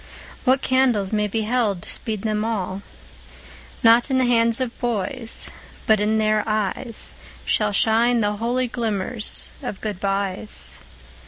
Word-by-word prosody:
What 260 +1 +3
candles 245 -7 +2
may 210 -1 +2
be 220 +2 -1
held 215 -6 0
to - - -3
speed 215 -4 -2
them 215 -1 0
all? 200 -4 -2 1.0
Not 230 +3 +6
in 265 - +2
the 260 - +3
hands 230 -1 +3
of 250 -2 -2
boys, 235 0 -3 0.3
but 220 -3 +4
in 215 +1 +2
their 215 -1 +2
eyes 215 +2 -2 0.3
Shall 210 -1 +2
shine 230 +4 +3
the 210 -1 0
holy 245 +3 0
glimmers 225 -2 -2
of 195 - -5
goodbyes. 185 - -2
220 Hz, 140 wpm, -22 LUFS, 205-235 Hz, 1.0 s, Not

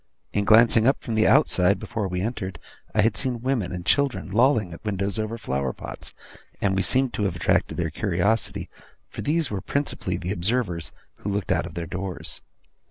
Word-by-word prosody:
In 100 0 +1
glancing 115 +1 +6
up 135 - +2
from 115 - -3
the 110 0 +3
outside, 100 -9 +4
before 105 -3 -3
we 90 -1 -2
entered, 95 -4 -3 0.4
I 105 - +5
had 110 +1 +2
seen 125 -3 0
women 125 -8 0
and 90 -1 -5
children 135 - +1
lolling 110 -4 +3
at 85 - -10
the - - -9
windows 100 0 -1
over 110 +1 -2
flower 65 - -2
pots; - - -8 0.5
and 95 -2 +1
we 95 - +2
seemed 130 +6 +2
to 105 - -1
have 95 -3 -1
attracted 85 - +1
their 80 -3 -1
curiosity, 100 +1 0 0.4
for - - -7
these 155 -2 0
were 100 -2 -2
principally 105 -6 -2
the 90 +1 -4
observers 95 -3 -1 0.3
who 105 - -5
looked 100 -1 -1
out - - +1
of 85 - -11
their 85 -1 -3
doors. 90 +1 -5
100 Hz, 195 wpm, -25 LUFS, 90-115 Hz, 0.5 s, glancing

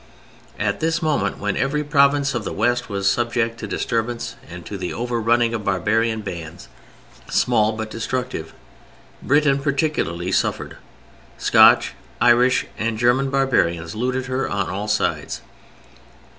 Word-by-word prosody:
At - - -1
this 165 +1 0
moment, 155 -2 0
when 105 -1 -2
every 145 +3 0
province 140 -1 +3
of 120 -3 -2
the - - -4
West 120 +3 0
was 100 -1 -1
subject 115 +1 0
to 110 - -5
disturbance 115 +1 -2
and 85 0 -9
to 105 - -6
the 90 -2 -4
over 120 -1 -2
running 115 +1 +2
of 110 -2 -3
barbarian 110 +4 0
bands, 85 -3 -8 0.6
small 110 0 +2
but 110 0 -5
destructive, 115 -7 -4 0.7
Britain 145 -1 +3
particularly 135 - -1
suffered. - - -1 0.6
Scotch, - - +5 0.3
Irish 120 +1 +4
and 110 0 -1
German 125 +4 +2
barbarians 95 -12 +1
looted 125 +3 -2
her 130 +1 -2
on 100 -2 -2
all 100 +3 -4
sides. 105 0 -1
115 Hz, 135 wpm, -21 LUFS, 105-130 Hz, 0.7 s, Scotch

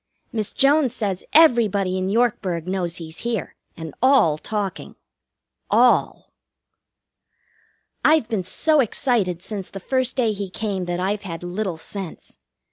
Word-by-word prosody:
Miss 215 -3 -2
Jones 275 -2 +3
says 195 -6 -2
everybody 220 - +4
in 185 0 -1
Yorkburg 195 -7 0
knows 180 -2 -2
he's 160 -1 -7
here, 230 -4 -3 0.2
and 160 -3 -7
all 255 - +4
talking. 205 -1 -4 0.7
All! - - +2 1.7
I've 310 -7 +4
been 220 -4 -1
so 300 - +1
excited 215 -8 +1
since 200 -3 -5
the 195 - -8
first 260 +5 -1
day 235 -5 +1
he 200 -1 -5
came 195 -2 -3
that 175 0 -3
I've 200 +3 -1
had 175 -4 -7
little 180 0 -3
sense. 185 - -8
200 Hz, 130 wpm, -22 LUFS, 180-235 Hz, 1.7 s, everybody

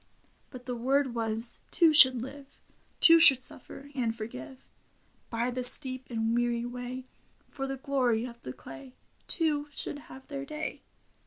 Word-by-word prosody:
But 250 -2 -13
the 250 -1 -5
word 265 +2 -1
was, 225 0 -1
two 330 -3 +2
should 260 -5 +6
live: 275 +1 -12 0.4
Two 330 0 +6
should 270 -5 +7
suffer 275 +3 -6
— - - -26
and 235 -4 -2
forgive: 230 +3 -10 0.6
By 235 +2 -3
the 255 +1 -5
steep 255 0 +6
and 225 -1 -2
weary 240 0 -2
way. 250 +1 -8 0.5
For 270 -1 -6
the 270 0 -6
glory 255 -5 -1
of 235 -1 -12
the 125 - -8
clay. 135 0 -13 0.3
Two 300 -3 -2
should 290 0 -5
have 265 -2 -15
their 275 -2 -7
day. 305 +2 -7
255 Hz, 160 wpm, -27 LUFS, 235-280 Hz, 0.6 s, should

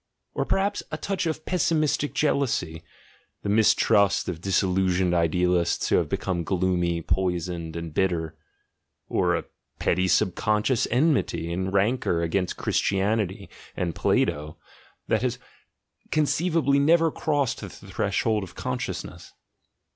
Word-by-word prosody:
or - - -1
perhaps 200 +1 0
a 155 - -3
touch 190 0 -2
of 155 -1 -3
pessimistic 155 -4 0
jealousy, 115 - 0 0.6
the 100 - -2
mistrust 100 -2 +3
of 85 -2 -4
disillusioned 95 -1 +1
idealists 85 +1 +1
3 - - +4
have - - -2
become 90 -3 -2
gloomy, 90 -2 0
poisoned, 85 -3 -2
and 85 -2 -5
bitter? 85 -3 0 0.7
or - - +2
a - - -3 0.3
petty 95 0 +1
subconscious 105 +5 +1
enmity 125 - +1
and 95 +2 -2
rancour 100 -3 +1
against 90 +2 -1
Christianity 100 0 0 0.3
(and 85 -2 -1
Plato), 75 0 0 0.5
that 110 - +1
has 125 -1 -1 0.7
conceivably 155 -1 +2
never 165 +3 +4
crossed 145 -5 -1
the 105 - -6
vshold 100 +3 -1
of 90 -3 -9
consciousness? - - -5
95 Hz, 115 wpm, -25 LUFS, 90-130 Hz, 0.7 s, 3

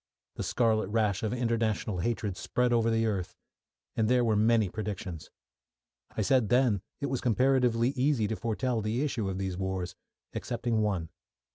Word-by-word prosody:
The - - -6
scarlet 110 -4 +1
rash 105 -2 +1
of 110 - -1
international 115 -5 0
hatred 105 0 -1
spread 125 +5 0
over 115 -1 +3
the 115 0 +2
earth, 100 -5 -2 0.6
and 110 0 +1
there 125 -1 +4
were 110 -2 +2
many 110 0 +3
predictions. 95 -5 -5 0.9
I 110 - +2
said 125 -1 +3
then 120 -6 +3 0.2
it - - 0
was 135 -3 -2
comparatively 125 -1 +3
easy 130 -4 +1
to 110 - -2
foretell 115 +1 -1
the 110 +6 -1
issue 115 -9 -1
of 95 - -3
these 95 -2 -3
wars 95 -2 -2 0.4
excepting 120 -2 -1
one. 95 -6 -1
110 Hz, 160 wpm, -29 LUFS, 100-120 Hz, 0.9 s, there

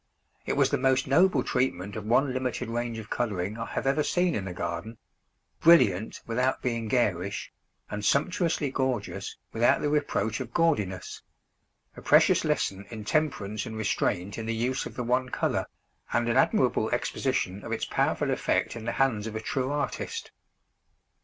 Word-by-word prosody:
It - - +1
was - - +3
the - - +1
most 130 0 +2
noble 145 0 +4
treatment 100 -6 -1
of 110 -2 -5
one 130 +3 +3
limited 125 -2 -2
range 120 0 -2
of 110 -1 -9
colouring 105 -2 -2
I 115 - -3
have - - -3
ever 135 +3 +2
seen 175 +3 +1
in 95 -6 -3
a - - -4
garden; 85 +6 -4 0.6
brilliant 110 - +4
without 125 +3 0
being 115 -3 -1
garish, 100 -6 0 0.4
and 105 0 -5
sumptuously 155 - +1
gorgeous 130 -6 -2 0.2
without 115 +1 +3
the 145 - 0
reproach 130 -7 0
of 120 -3 -7
gaudiness 105 - 0 0.7
a - - -10
precious - - +5
lesson 100 +1 -1
in 110 -3 -7
temperance 110 -8 -1
and 110 -1 -6
restraint 100 -2 -1
in 110 - -5
the 115 - -1
use 125 +4 -1
of - - -12
the 125 - -3
one 125 +2 +1
colour, - - -1 0.4
and 120 0 +1
an 115 - +1
admirable - - +3
exposition 95 +2 -1
of - - -7
its - - -1
powerful - - 0
effect - - 0
in 115 -1 -7
the 115 - -1
hands 115 -6 +1
of 110 - -6
a - - -1
true 130 +3 -2
artist. 145 -1 -3
115 Hz, 170 wpm, -28 LUFS, 105-130 Hz, 0.7 s, precious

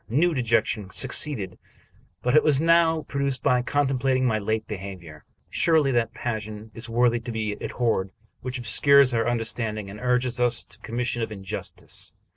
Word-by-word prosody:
New 160 +9 +3
dejection 115 -6 0
succeeded, 110 0 -2 0.6
but 125 +5 +5
was 145 -3 +4
now 165 -1 +4
produced 140 -2 -2
by 125 -3 +3
contemplating 130 -1 +1
my 110 -3 +2
late 110 +2 -1
behavior. 95 -6 -8 0.3
Surely 155 -5 +3
that 115 -3 +1
passion 110 -2 -5
is 115 +3 -8
worthy 120 0 +3
to 120 +1 -6
be 110 -2 -2
abhorred 115 -6 0 0.3
which 130 +1 -4
obscures 130 +3 +4
our 115 +1 +1
understanding 110 -3 -2
and 105 - -9
urges 125 0 +1
us 120 -1 +2
to - - -12
the - - -10
com 115 - -6
mission 120 -1 -1
of 110 - -2
injustice. 95 -3 -6
120 Hz, 160 wpm, -25 LUFS, 110-135 Hz, 0.6 s, but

